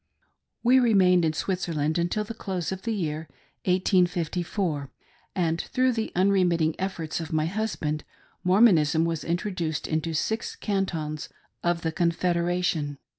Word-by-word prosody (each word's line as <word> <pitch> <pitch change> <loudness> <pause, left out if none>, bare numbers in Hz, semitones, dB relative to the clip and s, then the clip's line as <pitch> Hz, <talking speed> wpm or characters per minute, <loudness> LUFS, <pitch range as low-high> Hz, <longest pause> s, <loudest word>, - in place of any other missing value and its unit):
We 250 +2 +6
remained 190 -7 +4
in 155 - +1
Switzerland 160 -3 -1
until 175 +5 0
the 210 - -6
close 190 -6 -3
of 190 0 -4
the 230 - -2
year 160 -4 -3 0.4
1854, 180 -4 +1 0.5
and 165 -3 +1
through 255 0 +1
the 225 -2 -2
unremitting 180 -4 +3
efforts 180 -5 -3
of 165 -2 -6
my 155 -1 +1
husband, 165 -6 -2 0.4
Mormonism 175 -6 +5
was 165 -2 -2
introduced 170 -3 -2
into 160 +1 -1
six 220 +8 -1
cantons 165 -7 -2 0.3
of 175 -1 0
the 160 - 0
Confed 170 +1 +1
eration. 170 -4 0
175 Hz, 130 wpm, -26 LUFS, 160-190 Hz, 0.5 s, We